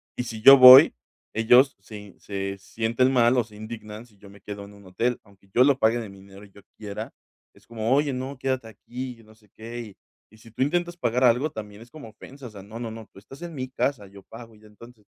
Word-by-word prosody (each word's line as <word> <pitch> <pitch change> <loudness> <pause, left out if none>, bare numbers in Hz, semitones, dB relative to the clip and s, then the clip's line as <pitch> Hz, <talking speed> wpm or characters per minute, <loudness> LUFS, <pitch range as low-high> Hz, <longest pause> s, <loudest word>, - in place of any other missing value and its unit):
Y, - - -3
si 110 -2 -8
yo 135 +4 +9
voy, 130 +3 +9 0.4
ellos 125 +5 +4
se 105 +2 -12
y 105 -2 -15
se 100 -1 -6
sienten 115 +6 -1
mal 120 0 +3
o 120 - +2
se 110 -2 -18
indignan 110 0 -10
si 105 -3 -27
yo 100 0 -16
me 100 - -18
quedo 100 -1 -9
en 100 - -15
un 100 -1 -18
hotel, 120 +6 -2
aunque 100 -1 -25
yo 125 - +5
lo 140 0 +3
pague 115 +1 +2
de 110 -3 -8
mi 100 - -14
dinero 100 +1 -15
y 100 - -21
yo 100 - -18 0.2
quiera, 105 -2 -8 0.4
es - - -24
como: 115 +1 -2
"Oye, 145 0 0
no, 130 +2 -6
quédate 130 -3 -3
aquí", 125 +4 -8
y - - -19
yo 115 - -19
no 110 0 -20
sé 105 -1 -28
qué. 115 -2 -9 0.4
Y, 110 - -20
si 115 +1 -18
tú 125 - -1
intentas 175 +4 -2
pagar 125 -3 -1
algo, 125 +6 +2
también 105 -1 -10
es 120 - -16
como 150 -7 -12
ofensa. 130 +5 -13
O - - -13
sea: 100 -2 -12
"No, 110 +3 -10
no, 115 -2 -6
no, 110 -1 -11
tú - - -16
estás 135 +9 -15
en 170 -1 -8
mi 130 -2 -6
casa. 130 -5 -3
Yo 100 0 -16
pago", 115 +1 -14
y - - -21
ya. 110 - -18
Entonces, 110 +1 -18
115 Hz, 260 wpm, -24 LUFS, 105-125 Hz, 0.4 s, yo